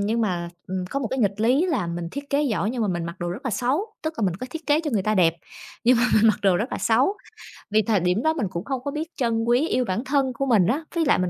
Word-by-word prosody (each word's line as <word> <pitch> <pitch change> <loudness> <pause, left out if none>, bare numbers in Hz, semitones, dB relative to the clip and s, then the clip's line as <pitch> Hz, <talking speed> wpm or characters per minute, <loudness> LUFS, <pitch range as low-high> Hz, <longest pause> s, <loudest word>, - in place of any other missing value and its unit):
nhưng 220 +3 0
mà, 175 -6 -1 0.2
ừm, 185 -1 -3
có 275 - -1
một 255 - -1
cái 265 - -2
nghịch 205 -3 0
lý 260 +10 +3
là 265 - 0
mình 170 0 -4
thiết 280 +5 -7
kế 285 +1 +2
giỏi 220 -6 0
nhưng 245 -1 -2
mà 210 - 0
mình 175 -2 -2
mặc 170 +2 -6
đồ 175 - -3
rất 205 - -6
là 260 - -1
xấu, 275 - -1
tức 315 +1 -3
là - - -1
mình 180 - -1
có 255 - -6
thiết 325 +2 -7
kế 295 +1 +3
cho 315 -2 -3
người 215 -6 +1
ta 215 +2 +1
đẹp, 170 -4 +4 0.5
nhưng 250 +1 +5
mà 235 - +2
mình 220 +1 +5
mặc 215 - +3
đồ 190 -3 +4
rất 225 +7 -2
là - - -2
xấu, 260 - +2 0.5
vì 215 +1 +3
thời 210 -1 +1
điểm 180 +6 +1
đó 315 0 +3
mình 275 -11 -1
cũng 170 -1 -5
không 265 -2 -3
có 285 - -3
biết 315 +3 -4
trân 230 -4 0
quý, 245 +6 +2
yêu 255 -5 +1
bản 220 +4 -2
thân 270 -2 +1
của 275 - -2
mình 215 -9 +4
á, 290 - 0
ví 335 - +2
lại 285 - +4
mình 180 -1 0
230 Hz, 315 wpm, -24 LUFS, 195-280 Hz, 0.5 s, nhưng